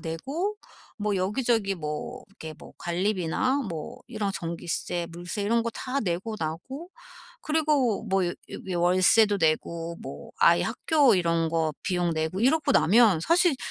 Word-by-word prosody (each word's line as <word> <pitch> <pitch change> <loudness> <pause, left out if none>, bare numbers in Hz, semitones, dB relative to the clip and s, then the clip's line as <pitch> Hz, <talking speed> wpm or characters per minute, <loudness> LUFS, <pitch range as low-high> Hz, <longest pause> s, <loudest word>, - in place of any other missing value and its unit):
내고 275 - -3 0.4
뭐 205 -1 0
여기저기 210 +1 0
뭐 155 +10 -5
이렇게 160 -5 -9
뭐 - - -13
관리비나 190 - 0
뭐 160 -3 -6
이런 210 -4 -2
전기세 170 0 -3
물세 175 +5 -5
이런 230 +3 +2
거 230 - -2
다 260 +4 -3
내고 195 +2 -2
나고 175 - -5 0.5
그리고 300 -9 +1
뭐 195 -3 +1
여 175 - -1 0.4
여 175 - -1
워 175 - +3
월세도 200 +3 +4
내고 165 +1 0
뭐 - - -9
아이 - - +5
학교 295 -7 +3
이런 165 -2 +1
거 160 -1 0
비용 175 -3 0
내고 160 +4 -2
이러고 280 +6 +2
나면 200 +3 +5
사실 335 - +3
195 Hz, 275 characters per minute, -26 LUFS, 170-245 Hz, 0.5 s, 아이